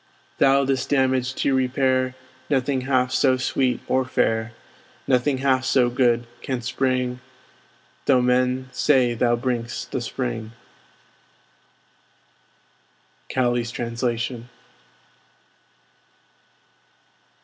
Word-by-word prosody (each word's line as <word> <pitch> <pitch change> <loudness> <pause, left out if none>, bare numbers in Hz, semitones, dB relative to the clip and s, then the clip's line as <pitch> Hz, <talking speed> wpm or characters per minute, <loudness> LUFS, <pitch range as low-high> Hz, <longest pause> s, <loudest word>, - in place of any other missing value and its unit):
Thou, 135 0 +4
this 130 -1 -1
damage 130 -2 +1
to 140 - 0
repair, 130 0 +1 0.3
Nothing 135 -1 +1
half 130 -1 +2
so 130 0 +3
sweet 125 0 0
or 130 0 +2
fair, 115 -3 0 0.5
Nothing 130 +2 +2
half 130 -1 +1
so 125 -2 +2
good, 120 -1 +2 0.2
canst 125 -2 -4
bring, 125 -1 0 0.9
Though 130 -2 +5
men 125 +1 +1
say 125 -2 +2
thou 120 0 +2
bring'st 120 -1 -3
the - - -2
Spring. 110 - -4 2.8
Cowley's 120 -2 0
Translation. 120 0 -3
130 Hz, 90 wpm, -23 LUFS, 120-130 Hz, 2.8 s, Though